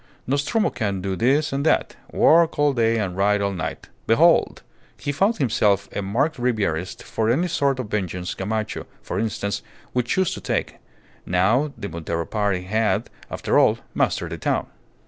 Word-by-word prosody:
Nostromo 145 Hz, -, +1 dB
can 100 Hz, -4 st, -2 dB
do 95 Hz, 0 st, -2 dB
this 140 Hz, -, +2 dB
and 140 Hz, +1 st, -1 dB
that 160 Hz, -, +1 dB, 0.2 s
work 165 Hz, +1 st, +4 dB
all 145 Hz, -1 st, +3 dB
day 115 Hz, -2 st, +2 dB
and 95 Hz, -5 st, -2 dB
ride 105 Hz, +2 st, +2 dB
all 100 Hz, 0 st, 0 dB
night 90 Hz, -4 st, -5 dB, 0.2 s
behold! -, -, +4 dB, 0.3 s
he 145 Hz, -, -3 dB
found 195 Hz, +10 st, +1 dB
himself 105 Hz, -6 st, +2 dB
a -, -, -1 dB
marked 120 Hz, +11 st, 0 dB
Ribierist 100 Hz, -7 st, -1 dB
for 110 Hz, 0 st, -1 dB
any 160 Hz, +10 st, +2 dB
sort 140 Hz, -5 st, +1 dB
of 120 Hz, -5 st, -5 dB
vengeance 90 Hz, -3 st, -2 dB
Gamacho, 110 Hz, +2 st, -3 dB, 0.2 s
for -, -, -3 dB
instance, 105 Hz, -2 st, -2 dB, 0.3 s
would 125 Hz, -1 st, 0 dB
choose 185 Hz, +6 st, +1 dB
to -, -, -7 dB
take, -, -, -2 dB, 0.5 s
now 110 Hz, +12 st, +2 dB
the 100 Hz, -, -5 dB
Montero 85 Hz, 0 st, -3 dB
party, 100 Hz, -4 st, -1 dB
had, 110 Hz, +2 st, 0 dB, 0.2 s
after -, -, +1 dB
all, -, -, +4 dB, 0.2 s
mastered -, -, 0 dB
the -, -, -5 dB
town. -, -, 0 dB
110 Hz, 165 wpm, -23 LUFS, 100-140 Hz, 0.5 s, work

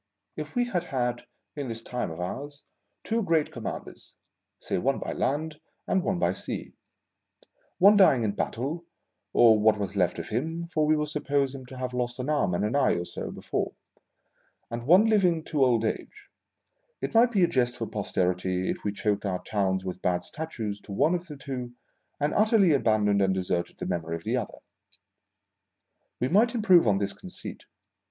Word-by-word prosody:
If -, -, -7 dB
we 245 Hz, 0 st, +2 dB
had 180 Hz, -8 st, -2 dB
had, 120 Hz, -5 st, -2 dB, 0.3 s
in 145 Hz, -3 st, -4 dB
this 115 Hz, -1 st, -6 dB
time 125 Hz, -6 st, -3 dB
of 80 Hz, +1 st, -8 dB
ours, 140 Hz, +11 st, -5 dB, 0.4 s
two 230 Hz, +1 st, 0 dB
great 165 Hz, -6 st, +1 dB
commanders -, -, -7 dB, 0.2 s
— -, -, -57 dB
say -, -, -2 dB
one 135 Hz, +7 st, +1 dB
by -, -, -4 dB
land 155 Hz, +3 st, -2 dB, 0.3 s
and 190 Hz, -, +2 dB
one 190 Hz, 0 st, -1 dB
by -, -, +1 dB
sea; -, -, -6 dB, 1.0 s
one 200 Hz, +3 st, +7 dB
dying 135 Hz, -, +6 dB
in 105 Hz, -, +1 dB
battle 135 Hz, +11 st, -3 dB, 0.5 s
(or 110 Hz, -2 st, +6 dB
what 105 Hz, 0 st, +4 dB
was 100 Hz, -1 st, -4 dB
left 90 Hz, -3 st, +1 dB
of 85 Hz, -, -6 dB
him, 160 Hz, +9 st, -2 dB
for 155 Hz, -3 st, 0 dB
we 155 Hz, 0 st, +4 dB
will 150 Hz, -, 0 dB
suppose 145 Hz, -2 st, 0 dB
him 130 Hz, -2 st, -9 dB
to 130 Hz, +1 st, -10 dB
have 125 Hz, 0 st, -4 dB
lost 125 Hz, -1 st, -2 dB
an 130 Hz, +3 st, -4 dB
arm 120 Hz, -13 st, +1 dB
and 100 Hz, -, 0 dB
an 110 Hz, -, -1 dB
eye 140 Hz, -2 st, +4 dB
or 85 Hz, -, -2 dB
so -, -, -6 dB
before), -, -, -3 dB, 1.0 s
and 120 Hz, +1 st, -5 dB
one 185 Hz, +7 st, +7 dB
living 185 Hz, -7 st, +3 dB
to 150 Hz, -4 st, +1 dB
old 120 Hz, -3 st, +3 dB
age -, -, -5 dB, 0.3 s
— -, -, -47 dB
it -, -, -2 dB
might 235 Hz, +2 st, +5 dB
be 200 Hz, -5 st, +3 dB
a -, -, +5 dB
jest 125 Hz, -4 st, 0 dB
for 115 Hz, -, -2 dB
Posterity 90 Hz, -3 st, -1 dB
if -, -, -6 dB
we 105 Hz, -, 0 dB
choked 105 Hz, 0 st, -1 dB
our 90 Hz, -1 st, -2 dB
towns 95 Hz, -3 st, 0 dB
with 90 Hz, 0 st, -5 dB
bad 90 Hz, -1 st, 0 dB
Statues 110 Hz, -, -5 dB
to -, -, -12 dB
one 150 Hz, -, +2 dB
of 180 Hz, 0 st, -2 dB
the 150 Hz, -3 st, -8 dB
two, 125 Hz, -3 st, -6 dB, 0.5 s
and 145 Hz, +1 st, 0 dB
utterly 210 Hz, -5 st, +4 dB
abandoned 105 Hz, -6 st, +2 dB
and 95 Hz, -1 st, +2 dB
deserted 90 Hz, -2 st, -2 dB
the -, -, -5 dB
memory 80 Hz, -1 st, -2 dB
of 85 Hz, -, -7 dB
the 115 Hz, +3 st, 0 dB
other. 120 Hz, -5 st, -3 dB, 1.6 s
"We 125 Hz, -, +1 dB
might 225 Hz, -, +3 dB
improve 185 Hz, -, +5 dB
on 100 Hz, -2 st, +4 dB
this 100 Hz, 0 st, -2 dB
conceit. -, -, -10 dB
125 Hz, 190 wpm, -27 LUFS, 105-160 Hz, 1.6 s, one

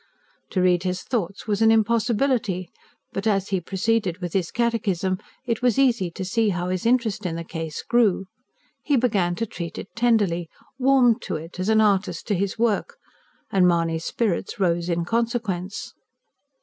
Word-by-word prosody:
To 185 Hz, -, 0 dB
read 180 Hz, -1 st, +3 dB
his 180 Hz, -1 st, -2 dB
thoughts 200 Hz, -6 st, -3 dB
was 210 Hz, -1 st, -1 dB
an 225 Hz, -, +6 dB
impossibility; 225 Hz, -4 st, +1 dB, 0.4 s
but 195 Hz, +3 st, -2 dB
as 195 Hz, -2 st, +1 dB
he 190 Hz, -2 st, 0 dB
proceeded 195 Hz, 0 st, 0 dB
with 175 Hz, -4 st, -5 dB
his 185 Hz, -4 st, 0 dB
catechism 200 Hz, -6 st, 0 dB, 0.3 s
it 235 Hz, -1 st, -1 dB
was 245 Hz, -1 st, +2 dB
easy 240 Hz, -9 st, +3 dB
to 185 Hz, +3 st, -6 dB
see 220 Hz, +3 st, +1 dB
how 180 Hz, -1 st, -2 dB
his 185 Hz, +4 st, -1 dB
interest 235 Hz, -4 st, +1 dB
in 175 Hz, -3 st, -2 dB
the 170 Hz, -, -4 dB
case 160 Hz, -2 st, -5 dB
grew. 220 Hz, -6 st, +2 dB, 0.6 s
He 290 Hz, -, +1 dB
began 205 Hz, -8 st, +1 dB
to 230 Hz, -, -2 dB
treat 170 Hz, -5 st, -7 dB
it -, -, -9 dB
tenderly; 205 Hz, -8 st, +2 dB, 0.3 s
warmed 255 Hz, -3 st, +4 dB
to -, -, -4 dB
it, 165 Hz, +3 st, -8 dB
as 185 Hz, +3 st, -1 dB
an 220 Hz, 0 st, +5 dB
artist 205 Hz, -2 st, +1 dB
to -, -, +3 dB
his 195 Hz, +1 st, -1 dB
work; 225 Hz, -3 st, 0 dB, 0.5 s
and 185 Hz, -2 st, +4 dB
Mahony's 165 Hz, -1 st, +1 dB
spirits 210 Hz, -3 st, -1 dB
rose 170 Hz, -2 st, +1 dB
in 170 Hz, 0 st, 0 dB
consequence. 225 Hz, -4 st, -2 dB
195 Hz, 170 wpm, -24 LUFS, 180-230 Hz, 0.6 s, an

